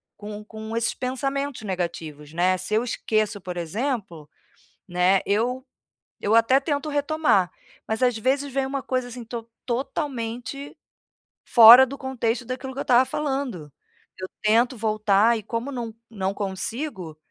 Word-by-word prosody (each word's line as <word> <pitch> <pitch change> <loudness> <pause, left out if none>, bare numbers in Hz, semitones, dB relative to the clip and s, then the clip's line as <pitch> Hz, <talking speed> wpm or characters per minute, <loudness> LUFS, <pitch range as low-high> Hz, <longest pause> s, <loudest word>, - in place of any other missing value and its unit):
com 210 0 -8
com 220 +1 -7
esses 230 0 +1
pensamentos 270 0 -3
negativos, 165 -6 -5
né. 180 +3 +2
Se 210 - -4
eu 220 - +2
esqueço, 215 -3 -1
por 180 -1 -6
exemplo, 175 - -3 0.6
né, 180 +2 +3
eu 245 +5 0 0.6
eu 205 - 0
até 230 +4 +5
tento 285 +1 -2
retomar, 290 - +2 0.4
mas 220 +2 -2
às 245 -3 +3
vezes 270 +4 0
vem 270 +1 0
uma 270 0 -3
coisa, 255 0 -2
assim, 245 0 -8
estou 230 0 -7 0.2
totalmente 255 +1 -4 0.7
fora 240 +3 +10
do 275 +2 -8
contexto 250 -2 -2
daquilo 255 +2 -5
que 275 - -7
eu - - 0
estava 250 +1 +5
falando. 265 - -3 0.5
Eu 185 - -4 0.2
tento 235 +4 +3
voltar 215 +1 +3
e - - -6
como 230 +5 -4
não 235 -4 -5 0.2
não 195 -2 -2
consigo 195 - -4
230 Hz, 145 wpm, -24 LUFS, 205-265 Hz, 0.7 s, fora